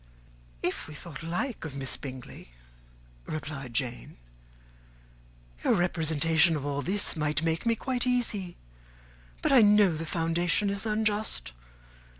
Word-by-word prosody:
"If - - -1
we 155 - -10
thought 150 -3 -9
alike 180 +9 -3
of 155 -4 -6
Miss 135 -1 0
Bingley," 130 - -9 0.8
replied 140 -5 -6
Jane, 115 - -3 1.5
"your - - +3
representation 160 -2 +2
of 145 -2 -4
all 145 0 -1
this 200 +6 +3
might 150 -1 0
make 165 +6 -1
me 230 - +3
quite 255 +1 -2
easy. 215 -8 -1 0.9
But - - +2
I 265 -3 +7
know 205 -4 +5
the 165 +1 -5
foundation 170 +5 +1
is 200 +2 -2
unjust. 210 - 0
165 Hz, 130 wpm, -28 LUFS, 150-205 Hz, 1.5 s, I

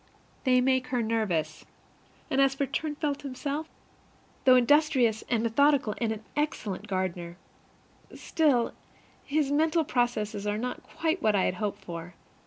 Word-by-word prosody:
They 255 -1 +4
make 260 0 +2
her 250 -2 0
nervous. 220 -8 -1 0.7
And 270 - +3
as 270 -1 +3
for 280 - 0
Turnfelt 295 +1 -2
himself, 285 +3 -4 0.8
though 255 -1 +8
industrious 250 -4 +3
and 230 -2 +1
methodical 265 0 +3
and 230 -2 0
an 220 0 -5
excellent 215 -9 -2
gardener, 180 -3 -3 0.8
still, 280 -7 +1 0.5
his 290 -1 0
mental 320 +3 +2
processes 215 -6 -1
are 205 0 0
not 250 +3 -4
quite 330 +2 -2
what 215 -1 +3
I 190 - +3
had - - +1
hoped 210 -2 -3
for. 170 0 -7
250 Hz, 140 wpm, -28 LUFS, 210-285 Hz, 0.8 s, though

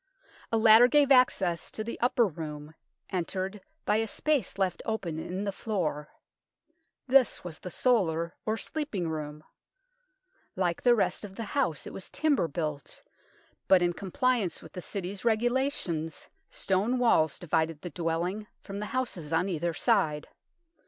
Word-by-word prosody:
A 225 - +3
ladder 220 +2 +8
gave 285 +1 +4
access 195 -10 +3
to 215 - -5
the 230 - -6
upper 245 -1 +3
room, 150 -4 -6 0.4
entered 190 +2 -3 0.2
by 210 - +3
a 225 0 0
space 295 -1 -1
left 190 -3 0
open 180 -8 -3
in 185 +4 -4
the 200 - -1
floor. 175 -9 -3 1.0
This 260 -3 +4
was 170 -3 -7
the 180 - -7
solar, 170 -7 +1
or 220 +1 -1
sleeping 250 - -3
room. 150 -1 -5 1.1
Like 175 -2 0
the 245 -1 +5
rest 220 - 0
of 195 -2 -8
the 230 - -4
house, 245 - 0
it - - -8
was 190 - -7
timber 290 - +1
built, 150 -2 -5 0.6
but 185 -2 +6
in 175 0 +2
com 190 +3 -7
pliance 235 -5 0
with - - -13
the 180 - -6
City's 195 +2 -5
regulations 230 - 0 0.2
stone 200 +7 0
walls 160 - +3
divided 160 -2 -1
the 175 - -6
dwelling 175 +6 -2 0.2
from 200 0 -6
the 210 - -4
houses 180 -12 -3
on 170 +4 +1
either 170 -1 -1
side. 160 -11 +1
190 Hz, 150 wpm, -29 LUFS, 165-230 Hz, 1.1 s, ladder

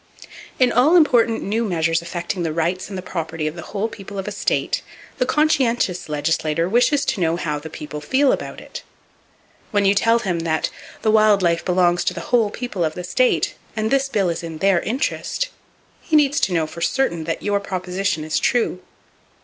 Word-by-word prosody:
In 255 -2 +4
all 280 +8 +4
important 240 -9 +4
new 220 +4 0
measures 165 -5 +1
affecting 175 +1 -4
the 165 -2 -1
rights 175 +4 -1
and 195 - -5
the 185 - -6
property 165 -3 -4
of 155 +1 -2
the 170 - -7
whole 205 +4 -3
people 205 -3 -9
of 195 - -4
a - - -3
state, - - -1 0.4
the 250 - +1
conscientious 250 - +1
legislator 155 +2 0
wishes 250 +7 +2
to 265 -8 -1
know 165 -1 +2
how 150 -4 -2
the 160 +2 -9
people 150 -1 -7
feel 265 - +3
about - - -4
it. - - -9 0.9
When 205 -2 +1
you 195 - +5
tell 230 +3 +3
him 190 -7 -2
that 160 -1 -1 0.3
"The 215 - +3
wild 215 -2 +4
life 170 -1 +2
belongs 175 -1 +2
to - - 0
the - - -5
whole 230 -4 +4
people 210 -5 -4
of 155 -1 -1
the 180 - -5
state; 250 +8 +1 0.2
and 220 +1 -1
this 275 0 +2
bill 200 -7 +1
is 170 - -3
in 165 -2 -6
their 195 +1 +3
interest," 275 - -2 0.5
he 315 - -1
needs 295 0 +4
to - - +1
know 165 -3 +1
for 165 +2 -9
certain 170 -5 0
that 165 - -3
your 205 -1 +1
proposition 185 -3 -2
is 155 - 0
true. 235 -7 +1
190 Hz, 200 wpm, -21 LUFS, 170-235 Hz, 0.9 s, you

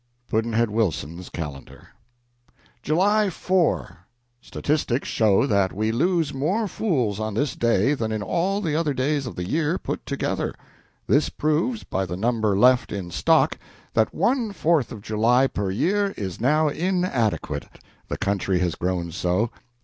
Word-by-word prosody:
Pudd'nhead 115 0 +1
Wilson's 90 -5 -2
Calendar. 75 -5 -8 0.9
July 200 - +2
4. 180 -1 0 0.4
Statistics 145 -3 -1
show 110 +1 +3
that 100 -6 +2
we 110 +3 0
lose 165 +4 +1
more 180 +12 0
fools 130 - -1
on 110 -1 -3
this 135 +3 0
day 115 +3 +2
than 115 -6 -2
in 110 -1 -2
all 185 - 0
the 160 -6 -1
other 155 -3 0
days 135 +1 0
of 115 - -7
the 90 0 -4
year 160 - 0
put - - -5
together. - - -2 0.5
This 145 +3 +3
proves, 165 +11 0
by 95 0 -2
the 90 +1 -4
number 110 -2 +1
left 125 +2 +4
in 95 -4 -5
stock, 85 - +2 0.3
that 110 - +2
one 230 +4 +1
Fourth 160 -8 +1
of 100 - -8
July 115 +5 +3
per 100 -7 -2
year 195 - 0
is 95 -2 -5
now 150 +5 +3
inadequate, 165 - -1 0.4
the - - -3
country 100 -1 0
has 90 -2 0
grown 90 -2 -2
so. 90 +7 0
120 Hz, 150 wpm, -24 LUFS, 100-160 Hz, 0.9 s, left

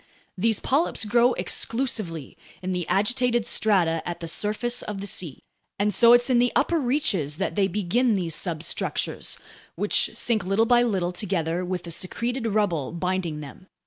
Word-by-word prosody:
These 220 +3 +1
polyps 280 -4 0
grow 235 +3 +3
exclusively 215 - -2 0.3
in 185 - -2
the 180 -2 -2
agitated 240 +3 +1
strata 185 -8 +2
at 175 - -5
the 165 - -6
surface 215 +7 -1
of 210 -2 -6
the 200 - -5
sea, 175 -7 -5 0.3
and 205 +1 +1
so 235 0 +6
it's 245 0 +5
in 250 -2 +3
the 245 0 +3
upper 330 +4 +2
reaches 235 - 0
that 195 - -2
they 200 -2 +2
begin 210 +5 +1
these 175 -4 -2
substructures, 160 0 -2 0.4
which - - +2
sink 220 -4 +1
little 195 +5 +2
by 240 +1 +4
little 190 -7 0
together 180 -2 -2
with 180 -1 -3
the 170 - -8
secreted 230 +8 -3
rubble 200 -9 0
binding 175 -3 -2
them. 150 +6 -11
200 Hz, 165 wpm, -25 LUFS, 175-235 Hz, 0.4 s, so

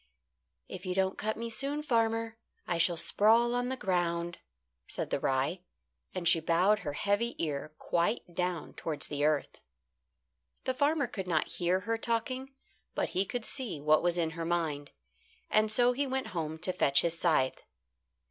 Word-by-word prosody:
"If 185 - -8
you 180 - -1
don't 190 0 +1
cut 215 +1 -2
me 230 0 -4
soon, 280 +6 -2
farmer, 225 -3 0 0.3
I 170 -2 -1
shall 170 0 +3
sprawl 225 +7 +4
on 245 0 0
the 260 - -2
ground," 175 -4 -1 0.5
said - - -4
the - - +1
rye, 135 +7 0 0.5
and 180 -2 -1
she 165 -1 +6
bowed 180 +6 +3
her 145 -5 -4
heavy 205 +8 0
ear 155 -1 -3
quite 170 +7 0
down 180 -1 -2
towards 155 -3 -3
the 145 -1 -2
earth. 150 -1 0 1.0
The 260 - 0
farmer 285 +2 +2
could 195 -5 -5
not 160 -3 +1
hear 180 +1 0
her 225 +3 -2
talking, 255 +4 -2 0.4
but - - 0
he 190 +2 +1
could 240 +2 -4
see 240 - -1
what 155 +1 +4
was 175 0 +2
in 165 -2 +1
her 165 +1 -5
mind, 160 -4 -1 0.6
and 215 0 +3
so 245 +2 +4
he 275 +3 -1
went 265 0 -2
home 160 -2 -3
to 185 +1 0
fetch 140 -6 +4
his 170 -1 -1
scythe. 145 -7 +2
185 Hz, 170 wpm, -31 LUFS, 165-230 Hz, 1.0 s, she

